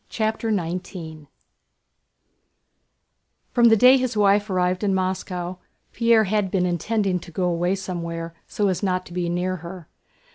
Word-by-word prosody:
CHAPTER 220 0 -1
XIX 170 -5 -4 2.2
From 240 -1 +3
the 225 -1 +6
day 255 +4 +7
his 255 -4 -2
wife 205 +1 +3
arrived 180 +1 0
in 195 -2 +2
Moscow 185 -1 -3 0.3
Pierre 230 -2 +4
had 205 -1 0
been 180 -1 +1
intending 185 +2 0
to 170 - -12
go 175 +3 -3
away 175 +2 +1
somewhere, 170 -3 -5
so 205 - 0
as 185 -2 -1
not 185 -2 -1
to 175 - -12
be 175 -1 -2
near 180 +2 -1
her. 170 0 -9
185 Hz, 145 wpm, -23 LUFS, 175-210 Hz, 2.2 s, day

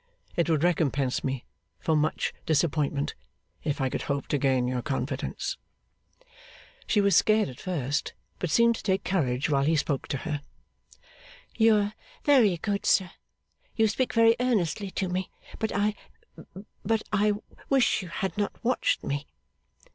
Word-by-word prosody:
It 170 0 +1
would 160 -2 +2
recompense 140 -6 +1
me 130 -2 -3 0.3
for 160 - +1
much 155 +1 0
disappointment 150 -2 +1 0.5
if 145 -2 -1
I 135 - +1
could - - -3
hope 140 -1 -2
to 145 - +1
gain 130 -2 +2
your 125 0 -1
confidence.' 135 +1 -3 1.3
She 210 - +3
was 200 -1 +3
scared 215 -4 +4
at 125 - -11
first, 145 -6 -2 0.3
but 180 - -2
seemed 235 +6 +5
to - - -8
take 190 -1 0
courage 135 -9 0
while 140 -2 +2
he 160 +3 +3
spoke 145 -2 -1
to 140 - -2
her. 150 -3 -2 1.1
'You 225 -1 +5
are 205 0 +1 0.3
very 240 -11 +5
good, 200 +4 -2
sir. 190 -2 +3 0.6
You 220 -1 +4
speak 245 +4 -1
very 230 0 +5
earnestly 205 -6 0
to 190 0 -2
me. 185 +1 -2 0.3
But 220 - -1
I 210 +1 +1 0.9
but 220 +1 +1
I 210 0 +3 0.4
wish 265 -5 +3
you 185 - -7
had 190 +3 -3
not 205 - 0
watched 250 +2 +1
me. 145 +1 -3
175 Hz, 155 wpm, -27 LUFS, 140-210 Hz, 1.3 s, seemed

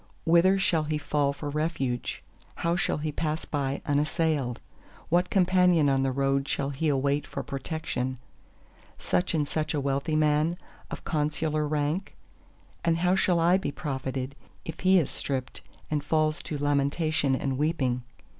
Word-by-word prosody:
Whither 170 +4 +5
shall 165 -5 +1
he 155 0 -1
fall 145 -1 +1
for 145 +1 -6
refuge—how 150 +2 -3
shall 185 - 0
he 150 0 -2
pass 155 +1 -2
by 140 -2 -2
unassailed? 150 -3 0 0.5
What 175 +2 +2
companion 180 -5 +4
on 135 -1 +2
the 135 0 +1
road 135 +1 +1
shall 140 0 -1
he 150 +4 -1
await 140 +1 +1
for - - -5
protection? 135 -2 -3 0.8
Such 180 -1 0
and 150 -2 +1
such 155 0 -1
a - - +1
wealthy 140 +3 0
man, 155 +2 +2 0.3
of - - -7
consular 155 0 0
rank? 150 +6 -1 0.7
And 165 -1 +2
how 180 +2 +2
shall 180 -2 +3
I 175 +3 +5
be 190 - -3
profited, 135 -2 -4 0.3
if 160 - -6
he 185 +1 +5
is 165 - +1
stripped 130 -2 -3 0.3
and 150 -2 0
falls 155 0 +1
to 150 - -4
lamentation 145 0 +1
and 135 0 -2
weeping? 135 -5 +1
150 Hz, 150 wpm, -27 LUFS, 140-165 Hz, 0.8 s, Whither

